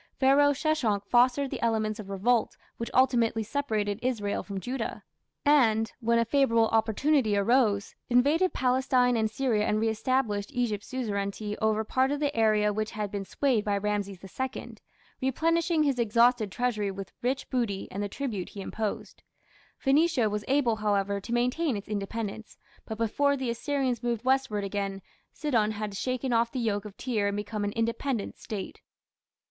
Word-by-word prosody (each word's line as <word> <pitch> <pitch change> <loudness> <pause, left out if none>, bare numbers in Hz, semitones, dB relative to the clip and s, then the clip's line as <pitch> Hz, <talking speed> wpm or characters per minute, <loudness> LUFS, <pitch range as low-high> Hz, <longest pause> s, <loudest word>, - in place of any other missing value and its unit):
Pharaoh 280 +2 +5
Sheshonk 270 -9 0
fostered 255 +3 +3
the - - -4
elements 220 -1 0
of 200 -2 -8
revolt 220 +4 +1 0.2
which 230 - -4
ultimately 235 -4 +3
separated 215 -4 -1
Israel 220 -5 -1
from 200 -2 -6
Judah, 250 +3 -4 0.4
and, 225 -7 +4
when 235 -1 +2
a 230 - +3
favourable 230 -3 +3
opportunity 225 +1 +2
arose, 205 -1 +2 0.2
invaded 290 +9 +3
Palestine 255 -1 +2
and 220 -1 +1
Syria 225 -2 0
and 210 - +1
reestablished 220 -1 0
Egypt's 230 -5 -1
suzerainty 210 -4 -3
over 220 0 +1
part 260 +4 +1
of 290 0 -1
the 290 -1 -1
area 215 -2 +3
which 215 +1 -2
had 210 -2 -4
been 200 -1 -4
swayed 250 -1 +1
by 205 -1 0
Rameses 200 -1 -2
II, 260 +7 -5 0.5
replenishing 330 +5 +1
his 275 -4 +1
exhausted 235 -1 +3
treasury 220 -4 -1
with 195 -1 -7
rich 260 +2 -1
booty 230 -6 -1
and 200 - -4
the 205 - -2
tribute 215 -6 -4
he 200 - -8
imposed. 215 +1 -4 0.6
Phoenicia 275 -5 +2
was 210 0 -2
able, 260 -5 +2
however, 200 -1 0
to 230 - -8
maintain 250 +3 +1
its 200 - -8
independence, 210 +1 -5 0.3
but 220 - -6
before 280 +6 +1
the 260 -3 -2
Assyrians 260 -1 -1
moved 240 -1 -2
westward 260 -6 +1
again, 195 -1 -3 0.3
Sidon 235 -9 +1
had 210 -1 -4
shaken 255 +4 -2
off 230 0 +2
the - - -5
yoke 210 -4 -1
of 200 -2 -10
Tyre 220 -6 -1
and 200 0 -1
become 210 0 -3
an 205 - -1
independent 230 0 -2
State. 205 -3 -6
230 Hz, 160 wpm, -28 LUFS, 210-260 Hz, 0.6 s, Pharaoh